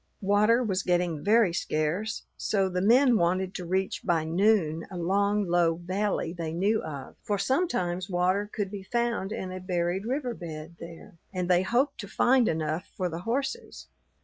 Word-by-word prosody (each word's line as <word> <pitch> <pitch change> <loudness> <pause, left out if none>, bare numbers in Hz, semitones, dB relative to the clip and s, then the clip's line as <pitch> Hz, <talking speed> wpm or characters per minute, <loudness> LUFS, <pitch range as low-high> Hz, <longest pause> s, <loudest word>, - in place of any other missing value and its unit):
Water 210 +5 +4
was 195 -4 0
getting 175 -4 0
very 215 -3 +4
scarce, 170 +8 -1
so 195 -2 0
the 180 0 -1
men 240 +4 +5
wanted 185 +2 +1
to 180 - -6
reach 190 +2 -1
by 165 -3 +1
noon 165 -2 +1
a 185 - -7
long, 200 +4 +1
low 170 -2 +2
valley 185 0 -2
they 165 -3 -4
knew 200 +6 +1
of; 140 -4 -7
for 205 - -1
sometimes 195 - 0
water 185 +3 +1
could 200 -3 -3
be 205 -2 -6
found 235 -1 -1
in 190 -4 -4
a 185 - -5
buried 180 +2 -1
river 255 -1 -1
bed 165 -3 -8
there, 170 0 -11
and 180 -2 -2
they 180 -1 +4
hoped 250 +8 0
to 200 - -6
find 245 +3 +3
enough 160 +3 -2
for 185 -2 -1
the 165 0 -5
horses. 270 - -4
190 Hz, 175 wpm, -28 LUFS, 175-215 Hz, -, men